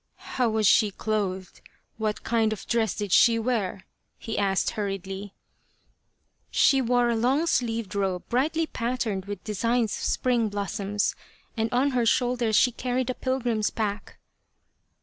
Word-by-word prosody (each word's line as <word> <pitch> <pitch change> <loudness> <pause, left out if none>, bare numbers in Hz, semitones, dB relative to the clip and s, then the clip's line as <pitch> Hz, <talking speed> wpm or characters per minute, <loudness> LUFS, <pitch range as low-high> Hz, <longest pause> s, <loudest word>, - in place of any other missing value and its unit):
" - - -48 0.2
How 250 -3 +2
was 220 -1 +1
she 210 +2 +5
clothed? 195 -3 -3 0.4
What 215 -1 -2
kind 225 -1 +1
of 215 - -9
dress 230 -2 0
did 205 -3 -4
she 230 +4 +6
wear? 220 -5 -2 0.2
" - - -50
he 225 - -5
asked 195 -1 +1
hurriedly. 195 -1 -5 0.6
" - - -47
She 270 -1 +4
wore 245 0 +2
a 235 - +1
long 260 +8 +2
sleeved 230 - -1
robe 190 -3 -2
brightly 310 +7 +1
patterned 230 -8 -2
with 200 -2 -6
designs 230 +1 0
of - - -6
spring 240 -3 +1
blossoms, 205 0 -2 0.4
and 225 -1 -1
on 265 +3 +2
her 245 -3 +1
shoulders 240 -2 +1
she 250 - +5
carried 250 +1 -2
a - - -3
pilgrim's 245 -5 -1
pack." 210 -2 -4
225 Hz, 155 wpm, -26 LUFS, 205-245 Hz, 0.6 s, she